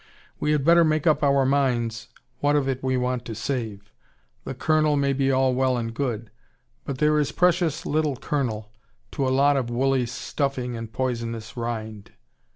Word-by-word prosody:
We 150 Hz, -, 0 dB
had 150 Hz, -3 st, +1 dB
better 170 Hz, +1 st, +6 dB
make 155 Hz, -1 st, +1 dB
up 155 Hz, -2 st, +3 dB
our 140 Hz, -2 st, +3 dB
minds 120 Hz, -5 st, 0 dB, 0.3 s
what 145 Hz, +1 st, +2 dB
of 140 Hz, -2 st, +1 dB
it 135 Hz, -1 st, -2 dB
we 130 Hz, -1 st, 0 dB
want 125 Hz, -1 st, -1 dB
to 115 Hz, -, -6 dB
save. 110 Hz, -3 st, -4 dB, 0.5 s
The 135 Hz, -, -5 dB
kernel 155 Hz, +2 st, +2 dB
may 140 Hz, -1 st, +1 dB
be 135 Hz, 0 st, +1 dB
all 130 Hz, -1 st, +3 dB
well 130 Hz, 0 st, +1 dB
and 115 Hz, -1 st, -3 dB
good. 115 Hz, -4 st, -3 dB, 0.5 s
But 135 Hz, -, -4 dB
there 150 Hz, +2 st, +3 dB
is 145 Hz, -1 st, 0 dB
precious 170 Hz, -3 st, +1 dB
little 150 Hz, -2 st, 0 dB
kernel, 120 Hz, -6 st, -3 dB, 0.4 s
to 140 Hz, -3 st, -1 dB
a -, -, +2 dB
lot 140 Hz, +2 st, +3 dB
of 125 Hz, -3 st, -1 dB
woolly 130 Hz, +1 st, +1 dB
stuffing 125 Hz, 0 st, -3 dB
and 115 Hz, -1 st, -6 dB
poisonous 115 Hz, -2 st, -3 dB
rind. 110 Hz, -3 st, -5 dB
130 Hz, 175 wpm, -24 LUFS, 120-145 Hz, 0.5 s, better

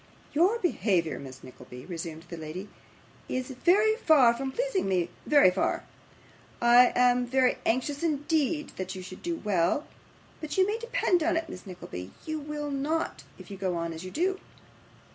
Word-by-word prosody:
'Your 360 Hz, +9 st, +3 dB
behaviour, 190 Hz, -, 0 dB
Miss 135 Hz, -1 st, -10 dB
Nickleby,' 125 Hz, 0 st, -11 dB
resumed 165 Hz, -2 st, -6 dB
the 175 Hz, -, -7 dB
lady, 165 Hz, +5 st, -7 dB, 0.6 s
'is 255 Hz, +1 st, -3 dB
very 400 Hz, -, +3 dB
far 295 Hz, -, +5 dB
from 265 Hz, +3 st, -4 dB
pleasing 485 Hz, -, -1 dB
me 180 Hz, -3 st, 0 dB, 0.2 s
very 285 Hz, -11 st, +6 dB
far. 185 Hz, -, 0 dB, 0.8 s
I 240 Hz, +1 st, +6 dB
am 250 Hz, 0 st, +4 dB
very 255 Hz, +1 st, +2 dB
anxious 260 Hz, +5 st, 0 dB
indeed 305 Hz, -1 st, 0 dB
that 185 Hz, 0 st, -4 dB
you 185 Hz, -, -7 dB
should 185 Hz, 0 st, -10 dB
do 345 Hz, -1 st, -2 dB
well, 205 Hz, -, 0 dB, 0.5 s
but 305 Hz, +1 st, -5 dB
you 375 Hz, -, +5 dB
may 425 Hz, +3 st, -2 dB
depend 470 Hz, -7 st, +1 dB
upon 335 Hz, +1 st, +2 dB
it, 325 Hz, 0 st, -2 dB
Miss 180 Hz, -, -9 dB
Nickleby, 95 Hz, -, -8 dB, 0.2 s
you 315 Hz, -1 st, -3 dB
will 295 Hz, 0 st, -5 dB
not, 295 Hz, +4 st, -2 dB
if -, -, -12 dB
you 195 Hz, -, -6 dB
go 185 Hz, -2 st, -1 dB
on 170 Hz, 0 st, -3 dB
as 160 Hz, +2 st, -8 dB
you 185 Hz, -, -6 dB
do. 375 Hz, -, 0 dB
255 Hz, 170 wpm, -28 LUFS, -, 0.8 s, very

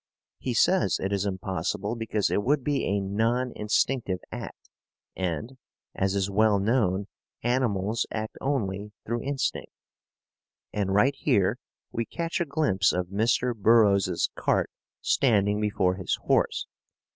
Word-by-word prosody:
He -, -, -3 dB
says -, -, +3 dB
it 95 Hz, +1 st, -2 dB
is 100 Hz, 0 st, 0 dB
impossible 95 Hz, +3 st, -2 dB
because 110 Hz, -3 st, -1 dB
it -, -, +2 dB
would 135 Hz, +4 st, +1 dB
be 145 Hz, +1 st, 0 dB
a 100 Hz, +1 st, +1 dB
non 115 Hz, +6 st, 0 dB
instinctive 105 Hz, -1 st, 0 dB
act, -, -, -8 dB, 0.5 s
and, 95 Hz, -, -3 dB, 0.3 s
as 95 Hz, 0 st, 0 dB
is 100 Hz, -1 st, +1 dB
well 105 Hz, +1 st, +3 dB
known 100 Hz, -2 st, +1 dB, 0.4 s
animals 115 Hz, -4 st, 0 dB
act 110 Hz, 0 st, -4 dB
only 105 Hz, -7 st, -2 dB
through 115 Hz, +1 st, -2 dB
instinct. 140 Hz, 0 st, -2 dB, 1.0 s
And 100 Hz, -2 st, -1 dB
right 105 Hz, +8 st, +4 dB
here 100 Hz, +2 st, +1 dB, 0.3 s
we 115 Hz, -, -2 dB
catch 170 Hz, +5 st, -3 dB
a -, -, +1 dB
glimpse 140 Hz, -, +2 dB
of 90 Hz, 0 st, -2 dB
Mr. 115 Hz, +4 st, +1 dB
Burroughs's 105 Hz, -2 st, +4 dB
cart -, -, 0 dB, 0.3 s
standing 105 Hz, -5 st, +2 dB
before 95 Hz, -3 st, +1 dB
his 95 Hz, -, -1 dB
horse. -, -, +1 dB
105 Hz, 135 wpm, -27 LUFS, 95-120 Hz, 1.0 s, right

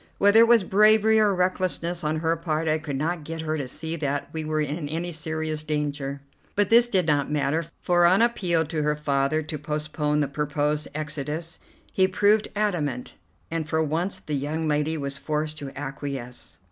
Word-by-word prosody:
Whether 205 Hz, +2 st, +6 dB
it 230 Hz, -, +7 dB
was 235 Hz, -3 st, +5 dB
bravery 215 Hz, +3 st, +5 dB
or 210 Hz, -1 st, +4 dB
recklessness 180 Hz, -2 st, 0 dB
on 155 Hz, +1 st, -1 dB
her 165 Hz, 0 st, +1 dB
part, 160 Hz, -1 st, -2 dB
I 155 Hz, 0 st, +2 dB
could 150 Hz, -3 st, -5 dB
not 160 Hz, +3 st, -2 dB
get 160 Hz, +1 st, -5 dB
her 155 Hz, 0 st, -2 dB
to 140 Hz, -4 st, -3 dB
see 160 Hz, +5 st, -4 dB
that 145 Hz, -2 st, -2 dB
we 160 Hz, -1 st, -3 dB
were 155 Hz, 0 st, -1 dB
in 150 Hz, 0 st, -2 dB
any 170 Hz, +3 st, -3 dB
serious 155 Hz, -1 st, -2 dB
danger; 145 Hz, -2 st, -3 dB, 0.3 s
but 205 Hz, 0 st, +2 dB
this 235 Hz, +1 st, +7 dB
did 190 Hz, -7 st, +1 dB
not 145 Hz, -3 st, +1 dB
matter, 150 Hz, +2 st, 0 dB, 0.2 s
for 175 Hz, -1 st, +4 dB
on 185 Hz, +3 st, +4 dB
appeal 180 Hz, -9 st, +1 dB
to 155 Hz, 0 st, -2 dB
her 150 Hz, 0 st, +1 dB
father 145 Hz, +1 st, 0 dB
to 155 Hz, 0 st, -6 dB
postpone 150 Hz, 0 st, -1 dB
the 145 Hz, -, +1 dB
proposed 150 Hz, +1 st, -1 dB
exodus 155 Hz, +2 st, -4 dB, 0.3 s
he 190 Hz, -1 st, +4 dB
proved 205 Hz, +3 st, +3 dB
adamant, 160 Hz, -12 st, -1 dB, 0.4 s
and 160 Hz, -2 st, -3 dB
for 160 Hz, 0 st, +1 dB
once 165 Hz, +6 st, -1 dB
the 150 Hz, -, -6 dB
young 150 Hz, +3 st, -2 dB
lady 150 Hz, +1 st, 0 dB
was 140 Hz, -1 st, -4 dB
forced 155 Hz, 0 st, -2 dB
to 140 Hz, -, -6 dB
acquiesce. 135 Hz, -3 st, -6 dB
155 Hz, 185 wpm, -25 LUFS, 150-175 Hz, 0.4 s, it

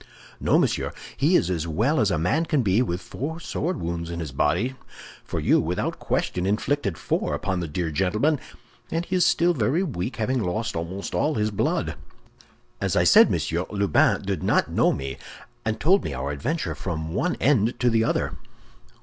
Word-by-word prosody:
"No, -, -, +3 dB
monsieur, -, -, 0 dB, 0.2 s
he 160 Hz, +6 st, +3 dB
is 90 Hz, -, +3 dB
as 85 Hz, -2 st, -2 dB
well 110 Hz, -, +1 dB
as 105 Hz, -, +3 dB
a 85 Hz, -, +1 dB
man 130 Hz, -, +1 dB
can 150 Hz, -6 st, +1 dB
be 100 Hz, +3 st, +3 dB
with 90 Hz, -8 st, -1 dB
four 160 Hz, +6 st, -5 dB
sword 175 Hz, -1 st, -3 dB
wounds 85 Hz, 0 st, -3 dB
in 85 Hz, 0 st, -4 dB
his 80 Hz, -5 st, -5 dB
body; 75 Hz, -, +1 dB, 0.5 s
for -, -, -4 dB
you, -, -, +3 dB
without -, -, -2 dB
question, 90 Hz, +1 st, -1 dB
inflicted 105 Hz, -, 0 dB
four -, -, -1 dB
upon 95 Hz, -1 st, -2 dB
the 85 Hz, -, -3 dB
dear 80 Hz, +2 st, -2 dB
gentleman, 105 Hz, -, +1 dB, 0.5 s
and 165 Hz, +1 st, -1 dB
he 185 Hz, -, -2 dB
is 180 Hz, -, +4 dB
still 175 Hz, +2 st, +3 dB
very 145 Hz, -, +1 dB
weak, 125 Hz, -, -3 dB
having 125 Hz, +3 st, 0 dB
lost 105 Hz, +4 st, -2 dB
almost 85 Hz, +4 st, -4 dB
all 155 Hz, -, +1 dB
his 105 Hz, 0 st, 0 dB
blood. 100 Hz, -, 0 dB, 0.9 s
As -, -, 0 dB
I -, -, +4 dB
said, -, -, +7 dB
monsieur, 85 Hz, +2 st, -1 dB
Lubin 100 Hz, -2 st, +2 dB
did -, -, -2 dB
not -, -, +2 dB
know -, -, +3 dB
me, 70 Hz, 0 st, -4 dB, 0.4 s
and 110 Hz, 0 st, -2 dB
told 190 Hz, -, +4 dB
me 70 Hz, -, -4 dB
our 65 Hz, +2 st, -3 dB
adventure 145 Hz, -, -2 dB
from 80 Hz, -3 st, -4 dB
one 180 Hz, -, 0 dB
end 120 Hz, -4 st, +2 dB
to 120 Hz, -1 st, +3 dB
the 115 Hz, 0 st, +3 dB
other." -, -, 0 dB
105 Hz, 190 wpm, -25 LUFS, 85-145 Hz, 0.9 s, said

